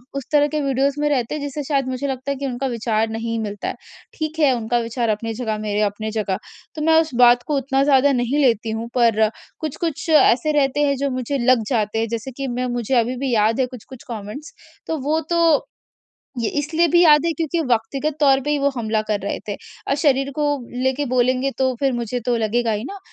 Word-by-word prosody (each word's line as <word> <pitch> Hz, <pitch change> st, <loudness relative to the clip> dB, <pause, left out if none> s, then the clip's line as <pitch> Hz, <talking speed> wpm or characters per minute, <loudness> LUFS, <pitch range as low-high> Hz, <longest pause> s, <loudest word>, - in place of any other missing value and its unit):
उस 275 Hz, -, -3 dB
तरह 295 Hz, -1 st, +4 dB
के 305 Hz, -, +1 dB
वीडियोज़ 275 Hz, +1 st, 0 dB
में 295 Hz, -, +2 dB
रहते 265 Hz, -1 st, 0 dB
हैं 300 Hz, -, -4 dB
जिससे 285 Hz, +1 st, -4 dB
शायद 275 Hz, -2 st, 0 dB
मुझे 260 Hz, +2 st, -3 dB
लगता 265 Hz, +1 st, -3 dB
है -, -, -1 dB
कि 280 Hz, -, -4 dB
उनका 265 Hz, 0 st, -2 dB
विचार 225 Hz, -2 st, -1 dB
नहीं 230 Hz, +1 st, -3 dB
मिलता 205 Hz, -2 st, -4 dB
है, -, -, -3 dB, 0.4 s
ठीक 310 Hz, 0 st, -4 dB
है 295 Hz, -4 st, +5 dB
उनका 235 Hz, +1 st, -1 dB
विचार 230 Hz, 0 st, -2 dB
अपनी 225 Hz, +1 st, -2 dB
जगह, 220 Hz, -2 st, -3 dB
मेरे 210 Hz, 0 st, -2 dB
अपने 210 Hz, +1 st, -1 dB
जगह 205 Hz, -4 st, -1 dB, 0.4 s
तो 305 Hz, -, -5 dB
मैं 320 Hz, -, +4 dB
उस 320 Hz, -4 st, -5 dB
बात 245 Hz, 0 st, +6 dB
को 300 Hz, -, 0 dB
उतना 270 Hz, 0 st, +1 dB
ज़्यादा 280 Hz, 0 st, +4 dB
नहीं 245 Hz, +3 st, 0 dB
लेती 235 Hz, -5 st, +2 dB
हूँ। 230 Hz, -, -5 dB
पर 225 Hz, -3 st, +3 dB, 0.3 s
कुछ-कुछ 320 Hz, +2 st, -4 dB
ऐसे 305 Hz, -2 st, +4 dB
रहते 280 Hz, +1 st, +2 dB
हैं 280 Hz, -, +1 dB
जो 280 Hz, +1 st, -1 dB
मुझे 255 Hz, +2 st, -2 dB
लग 255 Hz, -3 st, +4 dB
जाते 225 Hz, -3 st, 0 dB
हैं 225 Hz, -, 0 dB
जैसे 230 Hz, +4 st, -6 dB
कि 275 Hz, -1 st, -3 dB
मैं 250 Hz, +1 st, -2 dB
मुझे 240 Hz, +2 st, -2 dB
अभी 240 Hz, +3 st, -1 dB
भी 260 Hz, -, 0 dB
याद 220 Hz, +2 st, +2 dB
है 260 Hz, -, +3 dB
कुछ-कुछ 250 Hz, 0 st, -12 dB
कमेंट्स 225 Hz, +7 st, -7 dB, 0.3 s
तो 320 Hz, -, -1 dB
वो 310 Hz, +2 st, +2 dB
तो 340 Hz, 0 st, +2 dB, 1.0 s
ये 230 Hz, -, 0 dB
इसलिए 320 Hz, +4 st, +1 dB
भी 345 Hz, -, +7 dB
याद 300 Hz, 0 st, +6 dB
है 335 Hz, -, +1 dB
क्योंकि 330 Hz, 0 st, -2 dB
व्यक्तिगत 275 Hz, +7 st, -3 dB
तौर 275 Hz, -2 st, +5 dB
पे 295 Hz, -, -1 dB
ही 295 Hz, -, +1 dB
वो 280 Hz, 0 st, +2 dB
हमला 220 Hz, -1 st, 0 dB
कर 205 Hz, -, -1 dB
रहे 200 Hz, -, -3 dB
थे 205 Hz, -, -2 dB, 0.3 s
और -, -, +2 dB
शरीर 275 Hz, 0 st, +2 dB
को 295 Hz, -, +2 dB, 0.4 s
लेके 265 Hz, +2 st, 0 dB
बोलेंगे 255 Hz, +2 st, +2 dB
तो 260 Hz, -1 st, +1 dB
फिर 270 Hz, -2 st, +2 dB
मुझे 240 Hz, 0 st, -3 dB
तो 245 Hz, -1 st, +2 dB
लगेगा 225 Hz, +1 st, 0 dB
ही 210 Hz, +2 st, -3 dB
न 400 Hz, -, -8 dB
255 Hz, 225 wpm, -21 LUFS, 230-285 Hz, 1.0 s, भी